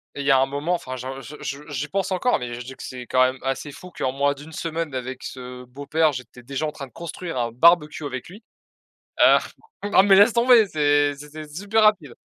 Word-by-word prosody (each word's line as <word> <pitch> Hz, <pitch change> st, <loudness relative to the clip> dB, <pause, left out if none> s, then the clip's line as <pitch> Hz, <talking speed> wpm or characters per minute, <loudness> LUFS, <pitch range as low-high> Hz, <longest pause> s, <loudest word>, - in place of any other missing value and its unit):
il 140 Hz, -, -4 dB
y 145 Hz, -, +4 dB
a 135 Hz, -, +6 dB
un 135 Hz, -, +4 dB
moment, 145 Hz, +6 st, -2 dB
enfin 130 Hz, -7 st, -4 dB
j'en 130 Hz, +2 st, -6 dB
je 140 Hz, +4 st, -10 dB
je 140 Hz, +1 st, -5 dB
je 150 Hz, -, -11 dB
j'y 145 Hz, +2 st, -3 dB
pense 195 Hz, +1 st, -2 dB
encore, 215 Hz, +7 st, +2 dB
mais 120 Hz, -1 st, -5 dB
je 120 Hz, -, -6 dB
dis 130 Hz, -, -8 dB
que -, -, -11 dB
c'est 125 Hz, -1 st, -8 dB
quand 130 Hz, -, +2 dB
même 130 Hz, +1 st, 0 dB
assez 135 Hz, +2 st, -3 dB
fou 180 Hz, +5 st, -12 dB
qu'en 130 Hz, -6 st, -2 dB
moins 140 Hz, +1 st, +1 dB
de 145 Hz, +1 st, -12 dB
1 160 Hz, -, -12 dB
semaine 165 Hz, -2 st, -4 dB
avec 130 Hz, 0 st, -5 dB
ce 125 Hz, -1 st, -8 dB
beau-père, 145 Hz, +5 st, 0 dB
j'étais 125 Hz, -2 st, -9 dB
déjà 140 Hz, +4 st, -3 dB
en 150 Hz, -, -2 dB
train 140 Hz, -3 st, -8 dB
de -, -, -24 dB
construire 170 Hz, 0 st, -7 dB
un 120 Hz, -1 st, -1 dB
barbecue 155 Hz, +3 st, +3 dB
avec 130 Hz, -3 st, -5 dB
lui. 210 Hz, +4 st, -13 dB, 0.8 s
Heu, -, -, +7 dB, 0.5 s
non 190 Hz, -, +6 dB
mais 195 Hz, -1 st, +6 dB
laisse 205 Hz, +4 st, +7 dB
tomber, 235 Hz, -1 st, +5 dB
c'est 145 Hz, -3 st, +2 dB
c'était 150 Hz, +2 st, -10 dB
super 205 Hz, +8 st, 0 dB
rapide! 190 Hz, -, +2 dB
145 Hz, 240 wpm, -23 LUFS, 130-170 Hz, 0.8 s, Heu